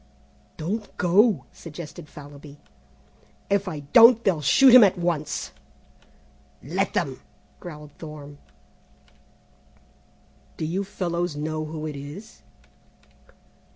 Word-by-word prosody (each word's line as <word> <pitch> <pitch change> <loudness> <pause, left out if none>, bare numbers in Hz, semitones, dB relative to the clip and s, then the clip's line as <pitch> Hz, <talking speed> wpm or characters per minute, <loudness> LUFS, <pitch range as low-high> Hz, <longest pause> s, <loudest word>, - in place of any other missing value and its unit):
"Don't 205 +7 -5
go," 185 - +3
suggested 155 -2 -10
Fallowby. 145 0 -12 0.9
"If 200 0 +1
I 155 -5 -5
don't 230 0 +8
they'll 175 -6 +1
shoot 255 - +6
him 250 -2 +10
at 195 -3 +3
once." 155 - -2 1.1
"Let - - -2
them," - - -2 0.4
growled 150 -4 -10
Thorne. 145 -2 -10 2.2
"Do 160 - -3
you 180 +5 -2
fellows 175 -4 -3
know 155 +1 -3
who 155 0 -6
it 150 -2 -5
is?" 145 +11 -10
160 Hz, 100 wpm, -24 LUFS, 150-195 Hz, 2.2 s, him